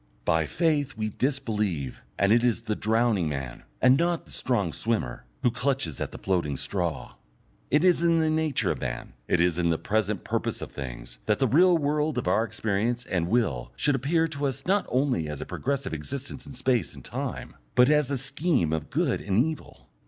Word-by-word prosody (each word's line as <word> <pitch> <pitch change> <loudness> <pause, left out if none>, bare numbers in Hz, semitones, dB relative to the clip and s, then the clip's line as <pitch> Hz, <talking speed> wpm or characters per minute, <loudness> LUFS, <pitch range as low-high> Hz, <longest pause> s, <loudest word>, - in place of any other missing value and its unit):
By 80 -1 +2
faith 150 - 0
we 110 -1 -1
disbelieve, 105 - -1 0.2
and 100 +1 +3
it 120 +1 +4
is 120 -2 +1
the 110 -2 -1
drowning 110 -6 +1
man, 70 -4 -5 0.2
and 130 +1 +6
not 170 0 0
the - - -17
strong 100 - 0
swimmer, 110 - -2 0.2
who 120 - +4
clutches 125 - -1
at - - -2
the - - -8
floating 85 -7 -1
straw. 85 -8 -2 0.6
It 150 +5 +3
is 180 -2 +4
in 170 -1 +4
the 160 -1 +2
nature 155 -3 +1
of - - -4
man, - - -4
it - - +2
is 90 0 +2
in 85 -1 +2
the 80 - +2
present 105 0 -1
purpose - - -2
of - - -7
things, - - -7
that 105 - +3
the 135 - +2
real 175 +7 +5
world 150 -1 0
of 125 - -2
our 100 +5 +3
experience 115 +2 -1
and 85 -2 -1
will 85 - 0
should 145 - +2
appear 155 +5 +1
to 145 -2 -1
us 135 - -4
not 195 +2 +2
only 125 - +1
as 75 -2 -5
a - - -4
progressive 140 -6 -2
existence 130 - -5
in 140 - -9
space 125 -1 0
and - - -12
time, - - -4 0.2
but 125 +4 +6
as 150 -3 +3
a 140 - 0
scheme 135 - 0
of 80 -2 -3
good - - 0
and 95 -1 -1
evil. 160 -1 -7
120 Hz, 200 wpm, -27 LUFS, 90-140 Hz, 0.6 s, and